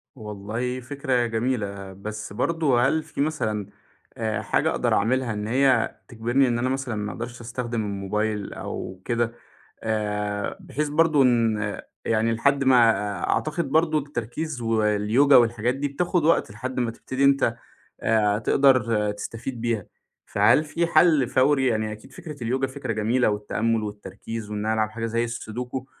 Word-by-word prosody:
والله 110 Hz, +3 st, -4 dB
فكرة 130 Hz, -1 st, -1 dB
جميلة. 110 Hz, -5 st, -2 dB
بس 105 Hz, +1 st, -7 dB
برضو 155 Hz, 0 st, +1 dB
هل 135 Hz, +6 st, +2 dB
في -, -, -5 dB
مثلًا 110 Hz, -10 st, -1 dB, 0.5 s
آآ، 110 Hz, -2 st, -1 dB
حاجة -, -, +1 dB
أقدر -, -, 0 dB
أعملها 120 Hz, +2 st, +1 dB
إن 105 Hz, 0 st, -4 dB
هي 130 Hz, -1 st, +2 dB
تجبرني 120 Hz, +3 st, +1 dB
إن 120 Hz, -1 st, 0 dB
أنا 130 Hz, +2 st, 0 dB
مثلًا 130 Hz, -4 st, -2 dB
ما 105 Hz, 0 st, -3 dB
أقدرش 120 Hz, +1 st, -7 dB
أستخدم 120 Hz, -1 st, -3 dB
الموبايل 105 Hz, +1 st, -2 dB
أو 95 Hz, 0 st, -6 dB
كده 120 Hz, -1 st, 0 dB, 0.5 s
آآ، 105 Hz, -2 st, -2 dB
بحيث 150 Hz, +1 st, -3 dB
برضو 150 Hz, -1 st, +4 dB
إن 115 Hz, -4 st, +1 dB, 0.2 s
يعني 115 Hz, 0 st, +1 dB
لحد 140 Hz, +4 st, +2 dB
ما 125 Hz, -3 st, +6 dB
آآ، 100 Hz, -3 st, -2 dB
أعتقد 155 Hz, -1 st, -1 dB
برضو 155 Hz, 0 st, +3 dB
التركيز 140 Hz, +1 st, -4 dB
واليوجا 110 Hz, +4 st, +3 dB
والحاجات 120 Hz, +1 st, +3 dB
دي 145 Hz, +1 st, -2 dB
بتاخد 175 Hz, +3 st, 0 dB
وقت 165 Hz, -, +3 dB
لحد 125 Hz, +5 st, -4 dB
ما 120 Hz, -, 0 dB
تبتدي 130 Hz, +4 st, -3 dB
أنت 135 Hz, -4 st, +3 dB, 0.5 s
آآ، 105 Hz, -2 st, +2 dB
تقدر 115 Hz, -5 st, +3 dB
تستفيد 115 Hz, +3 st, -6 dB
بيها، 115 Hz, -5 st, -1 dB, 0.4 s
فهل 105 Hz, +9 st, +4 dB
في 165 Hz, +3 st, -1 dB
حَل 155 Hz, -6 st, +4 dB
فوري، 135 Hz, 0 st, +3 dB
يعني 110 Hz, -2 st, 0 dB
أكيد 110 Hz, +5 st, -11 dB
فكرة 145 Hz, -6 st, -8 dB
اليوجا 130 Hz, +3 st, 0 dB
فكرة 130 Hz, -3 st, -4 dB
جميلة 110 Hz, +3 st, +2 dB
والتأمل 110 Hz, +2 st, -1 dB
والتركيز 105 Hz, +1 st, -7 dB
وإنّ 105 Hz, 0 st, -3 dB
أنا 110 Hz, -, +1 dB
ألعب 110 Hz, -1 st, +1 dB
حاجة 115 Hz, +1 st, -4 dB
زي 115 Hz, +1 st, 0 dB
السودوكو 120 Hz, +2 st, -5 dB
115 Hz, 150 wpm, -24 LUFS, 105-135 Hz, 0.5 s, ما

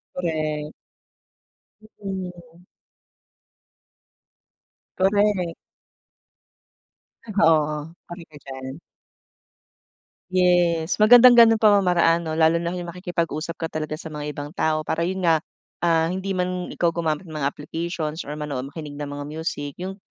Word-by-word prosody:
Correct. 155 Hz, -3 st, -2 dB, 1.3 s
Mm. 180 Hz, -3 st, -7 dB, 2.3 s
Correct. 195 Hz, -3 st, +2 dB, 1.8 s
Oo, 155 Hz, -3 st, +2 dB
correct 175 Hz, -1 st, -10 dB
ka 145 Hz, -, -13 dB
diyan. 130 Hz, -1 st, -7 dB, 1.6 s
Yes, 175 Hz, -2 st, +2 dB
magandang 245 Hz, +2 st, +8 dB
gano'ng 225 Hz, -2 st, +7 dB
pamamaraan 180 Hz, -5 st, +4 dB
'no, 160 Hz, -, -4 dB
lalo 160 Hz, 0 st, +4 dB
na 170 Hz, +1 st, -1 dB
yung 175 Hz, -1 st, -5 dB
makikipag-usap 170 Hz, -2 st, -3 dB
ka 165 Hz, -, -2 dB
talaga 155 Hz, -1 st, -5 dB
sa 160 Hz, -, -8 dB
mga 150 Hz, -1 st, -5 dB
ibang 145 Hz, 0 st, -7 dB
tao 155 Hz, -3 st, +1 dB
para 165 Hz, +1 st, 0 dB
yun 190 Hz, +2 st, -2 dB
nga, 165 Hz, -3 st, +2 dB, 0.4 s
ah, 165 Hz, -1 st, +3 dB
hindi 190 Hz, +2 st, -3 dB
man 180 Hz, -1 st, -2 dB
ikaw 170 Hz, -1 st, 0 dB
gumamit 160 Hz, +1 st, -2 dB
ng 155 Hz, -, -9 dB
mga 140 Hz, -2 st, 0 dB
applications 160 Hz, +1 st, -4 dB
or 145 Hz, -, -8 dB
manood, 145 Hz, -4 st, -4 dB
makinig 150 Hz, -2 st, -8 dB
ng 145 Hz, 0 st, -5 dB
mga 145 Hz, 0 st, -6 dB
music, 150 Hz, -2 st, -5 dB
yung, 190 Hz, +2 st, -6 dB
165 Hz, 120 wpm, -23 LUFS, 155-180 Hz, 2.3 s, magandang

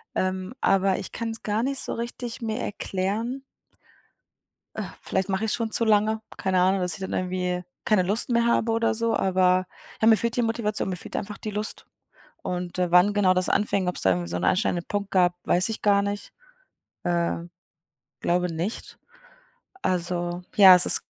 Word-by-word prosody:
ähm, 185 Hz, +3 st, -2 dB
aber 195 Hz, 0 st, +2 dB
ich 195 Hz, -, -8 dB
kann's 225 Hz, -1 st, -5 dB
gar 215 Hz, +2 st, 0 dB
nicht 270 Hz, 0 st, -1 dB
so -, -, -2 dB
richtig 235 Hz, 0 st, -5 dB
mir 220 Hz, -1 st, -2 dB
erklären 210 Hz, +7 st, -3 dB, 1.3 s
äh, -, -, -3 dB, 0.2 s
vielleicht 190 Hz, +1 st, -2 dB
mache 195 Hz, +3 st, 0 dB
ichs 215 Hz, -, +1 dB
schon 225 Hz, -2 st, -2 dB
zu 230 Hz, -, +1 dB
lange, 215 Hz, +1 st, +2 dB, 0.2 s
keine 190 Hz, -1 st, +1 dB
Ahnung, 190 Hz, +1 st, +3 dB
dass 180 Hz, -2 st, 0 dB
ich -, -, -7 dB
dann 190 Hz, -, -5 dB
irgendwie 180 Hz, -1 st, -2 dB, 0.2 s
keine 210 Hz, -4 st, +3 dB
Lust 205 Hz, +7 st, +1 dB
mehr 235 Hz, 0 st, +2 dB
habe 235 Hz, -1 st, +2 dB
oder 225 Hz, 0 st, +1 dB
so, 230 Hz, 0 st, 0 dB
aber, 185 Hz, -1 st, +2 dB, 0.4 s
ja, 220 Hz, -, +4 dB
mir 220 Hz, -1 st, +7 dB
fehlt 235 Hz, 0 st, -1 dB
die -, -, +3 dB
Motivation, 225 Hz, -3 st, -1 dB
mir 185 Hz, -, -2 dB
fehlt -, -, -8 dB
einfach 205 Hz, 0 st, -4 dB
die 215 Hz, -, -6 dB
Lust 210 Hz, +1 st, -4 dB, 0.6 s
und, 180 Hz, 0 st, -4 dB
äh, 180 Hz, -1 st, +1 dB
wann 180 Hz, +4 st, +5 dB
genau 190 Hz, -3 st, +3 dB
das 185 Hz, 0 st, 0 dB
anfing, 200 Hz, -3 st, +1 dB
ob 180 Hz, -, -2 dB
es -, -, -2 dB
da 95 Hz, -, +4 dB
irgendwie 90 Hz, -1 st, -1 dB
so 90 Hz, -, -3 dB
'n 90 Hz, -, -2 dB
einschneidenden 175 Hz, -, +1 dB
Punkt 205 Hz, -1 st, -3 dB
gab, 180 Hz, -2 st, +3 dB
weiß 180 Hz, +4 st, +3 dB
ich 220 Hz, -, -4 dB
gar 200 Hz, -1 st, +3 dB
nicht, 200 Hz, 0 st, -4 dB, 0.7 s
äh, 170 Hz, -1 st, 0 dB, 0.9 s
glaube 180 Hz, 0 st, 0 dB
nicht. 175 Hz, +7 st, -5 dB, 0.9 s
Also, 175 Hz, -1 st, -2 dB
ja, 190 Hz, -3 st, +9 dB
es 180 Hz, -, +3 dB
ist -, -, +4 dB
195 Hz, 185 wpm, -25 LUFS, 180-220 Hz, 1.3 s, ja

